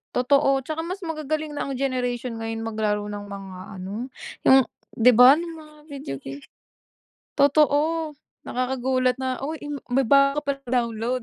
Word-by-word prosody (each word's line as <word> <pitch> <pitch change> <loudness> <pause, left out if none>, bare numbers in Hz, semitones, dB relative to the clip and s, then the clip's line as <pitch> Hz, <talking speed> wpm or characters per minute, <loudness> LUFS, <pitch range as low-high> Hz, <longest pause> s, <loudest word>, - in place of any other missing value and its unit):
Totoo, 275 +1 +3
'tsaka 315 +1 -3
mas 365 +4 -5
magagaling 310 -1 -3
na 290 - -3
ang 265 - -3
generation 250 -2 -2
ngayon 225 0 -4
maglaro 210 -2 -1
ng 205 0 -6
mga 195 -2 -8 0.2
ano, 205 +8 -5 0.3
yung 265 -1 +6 0.3
'di 245 +2 +7
ba 250 +5 +8
nung 335 0 -5
mga 305 0 -16
video 275 - -6
game. 135 +1 -9 1.0
Totoo, 300 +3 +3 0.3
nakakagulat 255 0 0
na, 260 0 -3
oh, 300 +4 -4
n 290 -2 -6 0.2
may 270 - +4
bago 275 +3 +4
ka 280 -1 -1
palang 240 -1 +1
download. 235 +3 -2
260 Hz, 155 wpm, -24 LUFS, 230-290 Hz, 1.0 s, ba